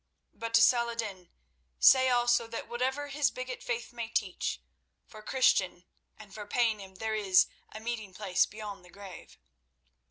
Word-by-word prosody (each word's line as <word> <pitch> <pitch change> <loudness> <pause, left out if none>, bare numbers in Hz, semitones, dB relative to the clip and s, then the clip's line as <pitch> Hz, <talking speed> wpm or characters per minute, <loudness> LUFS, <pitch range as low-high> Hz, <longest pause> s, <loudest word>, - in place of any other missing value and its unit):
But 230 0 -3
to 230 - +7
Saladin 230 -7 0 0.5
say 260 -1 +6
also 240 -1 +2
that 230 0 -6
whatever 260 +5 -2
his 280 -2 +1
bigot 255 0 -6
faith 240 0 -4
may 235 -1 -5
teach, 200 -5 -2 0.5
for 215 - -13
Christian 190 -7 +1 0.3
and 210 -2 -14
for 210 0 -8
Paynim 210 -5 -1
there 220 +3 -3
is 195 -3 +4 0.3
a 215 - -8
meeting 220 -3 -5
place 185 -1 +1
beyond 210 -3 -8
the 180 - -17
grave. 195 -2 -12
225 Hz, 150 wpm, -30 LUFS, 200-240 Hz, 0.5 s, to